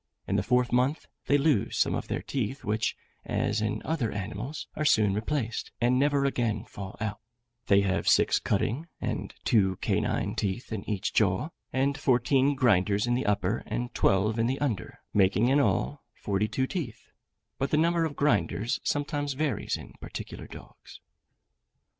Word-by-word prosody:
In - - 0
the - - +3
fourth 125 0 +2
month, 130 +5 +1 0.2
they 145 - +5
lose 140 -7 +1
some - - +2
of - - -3
their - - -3
teeth, 130 0 -3
which, 110 +1 0 0.3
as 105 +1 0
in 110 0 -2
other 150 -9 -1
animals, 105 +8 -5
are 155 - -1
soon 105 -9 +4
replaced, 115 +2 -2
and 125 +2 +3
never 140 0 +2
again 120 -5 0
fall 95 -2 -8
out: 105 -1 -3 0.5
they 100 0 +5
have 95 -1 0
six - - +4
cutting 120 +10 -1
and - - -3
two 95 -5 +3
canine - - 0
teeth 105 +4 -3
in 105 - -3
each 100 -3 -1
jaw, 100 - +2 0.2
and 135 +1 0
fourteen 135 +2 +3
grinders 105 -5 +3
in 120 - +1
the 125 -1 0
upper, 105 +1 +1
and 120 +3 -3
twelve 105 +4 +2
in 115 - +2
the 130 +2 0
under, 120 -11 -3
making 105 +4 +3
in 140 +2 +4
all 145 0 +1
forty 100 +1 -1
two 130 +4 0
teeth; 130 - -5 0.5
but 135 - 0
the 150 - +2
number 170 +1 +3
of 155 -3 -2
grinders 140 -5 +1
sometimes 145 0 -1
varies 140 -5 -1
in - - -11
particular - - -7
dogs. - - -13
120 Hz, 165 wpm, -28 LUFS, 105-140 Hz, 0.5 s, they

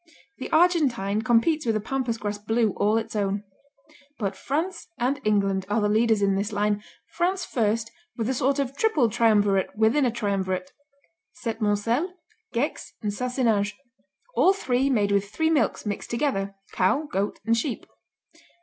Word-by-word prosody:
The - - -5
Argentine 270 - +3
competes 240 +8 +2
with 225 - +2
a - - +1
pampas 240 +1 -2
grass 205 -1 -4
Blue 225 +1 +1
all 210 +3 +1
its 225 0 -4
own. 200 0 -1 0.7
But 200 -3 -2
France 320 - -3
and 265 +3 0
England 195 -2 +1
are 210 +2 +2
the 210 - +2
leaders 220 -1 +3
in 195 0 +3
this 200 +3 -1
line, 205 0 0 0.2
France 365 +2 -1
first 225 -1 0 0.3
with 225 -2 -1
a 260 - +1
sort 265 +2 +1
of 275 -1 -2
triple 290 - +2
triumvirate 205 -4 +2
within 225 +7 +3
a 250 - +3
triumvirate 190 -5 -2 0.7
Septmoncel, 230 - 0 0.4
Gex, 265 +6 -2
and 205 -1 -1
Sassenage, 225 -4 0 0.6
all 380 - +5
three 265 -7 0
made 210 -6 +2
with 200 0 +1
three 320 +8 0
milks 285 -8 +1
mixed 205 -1 -4
together: 230 -6 -1 0.2
cow, 230 +11 +2
goat 200 -9 -2
and 230 0 +3
sheep. 235 +1 -2
225 Hz, 155 wpm, -25 LUFS, 205-265 Hz, 0.7 s, all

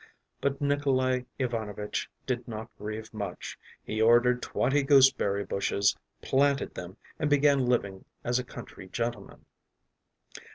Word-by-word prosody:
But 140 0 0
Nikolay 130 -3 +1
Ivanovitch 110 -5 -3 0.2
did 125 -2 -2
not 110 0 -7
grieve 110 +2 -6
much; 100 -4 -6 0.2
he 110 0 -2
ordered 120 +2 +5
twenty 145 +2 +1
gooseberry 135 -8 +4
bushes, 100 +1 +1 0.3
planted 140 0 +2
them, 90 +3 -8 0.2
and 150 - +1
began 140 -3 +4
living 100 -6 0 0.2
as 120 +1 +1
a - - -2
country 120 -6 -10
gentleman. 115 +1 -4
120 Hz, 120 wpm, -29 LUFS, 105-135 Hz, 0.3 s, ordered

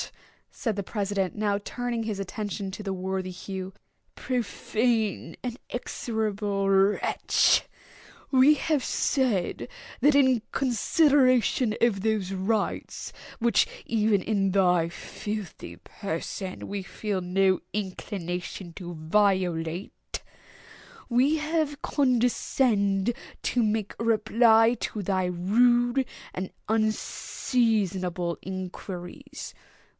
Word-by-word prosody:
said 225 -4 -2
the 200 - -2
president, 200 -2 -2
now 205 -1 0
turning 245 -1 -3
his 215 -3 -3
attention 200 0 -4
to 210 - -7
the 195 - -3
worthy 190 0 -3
Hugh, 190 +1 -6 0.4
"profane 225 -5 -1
and 245 -1 -3
execrable 210 -5 -2
wretch!—we 210 +7 +2
have 295 -1 0
said, 240 -10 0 0.3
that 290 0 +5
in 260 -4 +5
consideration 255 -2 +3
of 220 -5 +3
those 210 -3 0
rights 195 +2 -2 0.3
which, 235 -3 +3 0.2
even 215 -3 +2
in 195 -3 +1
thy 180 -3 +3
filthy 210 +3 -6
person, 190 0 -5
we 200 0 -3
feel 195 0 -3
no 185 +1 +2
inclination 185 -2 -4
to 175 -1 -7
violate, 175 0 0 0.9
we 260 +6 +3
have 305 -1 -1
condescended 240 -5 +2 0.3
to 245 - +1
make 215 -1 -1
reply 225 +1 +4
to 210 - -3
thy 185 -1 +1
rude 240 +8 +3 0.3
and 185 0 -4 0.2
unseasonable 210 -5 0
inquiries. 185 -1 -7
210 Hz, 95 wpm, -27 LUFS, 190-235 Hz, 0.9 s, that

